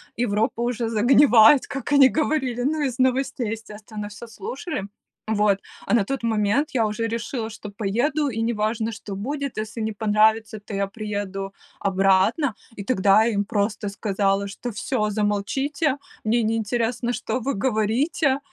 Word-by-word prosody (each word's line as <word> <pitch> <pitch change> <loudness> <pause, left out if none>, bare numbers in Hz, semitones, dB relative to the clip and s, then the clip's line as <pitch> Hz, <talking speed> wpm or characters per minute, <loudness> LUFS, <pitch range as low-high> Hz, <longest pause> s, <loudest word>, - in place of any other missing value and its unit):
Европа 225 0 0
уже 235 -1 -1
загнивает, 240 +2 +6
как 275 0 -5
они 270 -2 +7
говорили. 285 -5 0
Ну 295 +4 0
из 260 -3 -2
новостей, 255 -3 +1
естественно, 215 -1 -7
всё 225 +3 -10
слушали. 245 - -5 0.5
Вот. 210 -2 +2 0.3
А - - -1
на 225 -4 +4
тот 270 +2 -3
момент 225 +6 +1
я 235 -4 +1
уже 210 +2 -2
решила, 230 0 -3
что 215 -1 -9
поеду, 240 +9 0
и 225 -3 -4
неважно, 225 0 -1
что 205 -1 -8
будет, 280 +5 -4
если 220 +2 -4
не 220 - -1
понравится- 215 +1 +2
то - - -8
я 200 0 0
приеду 200 -2 -5 0.3
обратно. 195 - +2 0.2
И 200 - -6
тогда 205 -2 +4
им 205 -3 +1
просто 205 0 -1
сказала, 200 -1 0
что: 235 +4 -6
"Всё, 215 0 -1
замолчите, 260 +8 0 0.3
мне 230 +1 +2
не 220 +1 +1
интересно, 235 +2 -1
что 250 - -3
вы 275 +4 -1
говорите!". 260 - +1
225 Hz, 150 wpm, -23 LUFS, 210-250 Hz, 0.5 s, они